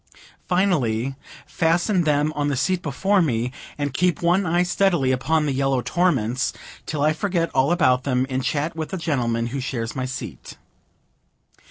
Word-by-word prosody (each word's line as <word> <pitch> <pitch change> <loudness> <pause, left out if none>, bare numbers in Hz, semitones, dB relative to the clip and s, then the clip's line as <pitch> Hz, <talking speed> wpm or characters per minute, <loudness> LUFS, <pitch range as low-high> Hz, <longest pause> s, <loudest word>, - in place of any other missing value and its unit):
Finally, 135 - +1 0.3
fasten 170 +4 +1
them 150 0 +2
on 145 -1 0
the 145 - 0
seat 185 +6 0
before 190 +6 +1
me, 125 -6 0 0.3
and 145 -2 -2
keep 175 +3 +1
one 180 +2 +2
eye 175 +2 +2
steadily 180 -7 +2
upon 150 +5 +1
the 145 - 0
yellow 135 0 +1
torments, 130 -4 +1 0.3
till 150 -2 -1
I 155 +1 +3
forget 170 0 -1
all 135 +4 +3
about 130 -8 +3
them, 130 -1 +1
in 130 -1 -2
chat 145 +5 -1
with 160 -1 -4
the 190 - -4
gentleman 120 -8 -1
who 140 - -2
shares 120 -3 -4
my 130 -1 -2
seat. 120 - -7
145 Hz, 165 wpm, -23 LUFS, 130-175 Hz, 0.3 s, I